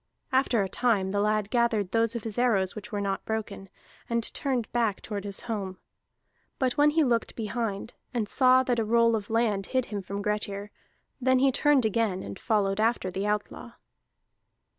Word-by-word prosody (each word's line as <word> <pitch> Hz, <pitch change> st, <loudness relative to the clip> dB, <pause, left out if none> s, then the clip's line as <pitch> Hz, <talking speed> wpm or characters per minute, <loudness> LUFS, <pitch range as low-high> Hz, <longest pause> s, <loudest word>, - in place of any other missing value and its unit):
After 260 Hz, -5 st, +2 dB
a -, -, -2 dB
time 195 Hz, -3 st, +1 dB
the 205 Hz, -, 0 dB
lad 210 Hz, -1 st, 0 dB
gathered 235 Hz, -6 st, +1 dB
those 230 Hz, 0 st, +2 dB
of 235 Hz, -, -4 dB
his 225 Hz, 0 st, -4 dB
arrows 200 Hz, -7 st, +2 dB
which 210 Hz, +1 st, -8 dB
were 205 Hz, -1 st, -2 dB
not 195 Hz, -1 st, -2 dB
broken, 210 Hz, -3 st, -4 dB, 0.4 s
and 235 Hz, -1 st, -1 dB
turned 255 Hz, -5 st, -1 dB
back 230 Hz, -4 st, +1 dB
toward 205 Hz, -2 st, -5 dB
his 200 Hz, -1 st, -4 dB
home. 200 Hz, -5 st, -4 dB, 0.8 s
But 255 Hz, -2 st, 0 dB
when 295 Hz, 0 st, +5 dB
he 315 Hz, +1 st, +3 dB
looked 235 Hz, -4 st, 0 dB
behind, 225 Hz, -1 st, -3 dB, 0.2 s
and 230 Hz, -4 st, -1 dB
saw 255 Hz, +2 st, +5 dB
that 245 Hz, -2 st, 0 dB
a -, -, +2 dB
roll 230 Hz, +1 st, +3 dB
of 205 Hz, -2 st, -4 dB
land 220 Hz, -4 st, +1 dB
hid 255 Hz, -2 st, 0 dB
him 200 Hz, -, -2 dB
from 200 Hz, +2 st, -5 dB
Grettir, 205 Hz, -1 st, -2 dB, 0.5 s
then 260 Hz, +1 st, +4 dB
he 270 Hz, +1 st, +4 dB
turned 285 Hz, -2 st, +3 dB
again, 215 Hz, -3 st, 0 dB
and 100 Hz, -, -8 dB
followed 200 Hz, -2 st, +1 dB
after 220 Hz, -4 st, +1 dB
the 195 Hz, +3 st, -2 dB
outlaw. 210 Hz, +3 st, -3 dB
220 Hz, 185 wpm, -27 LUFS, 200-240 Hz, 0.8 s, when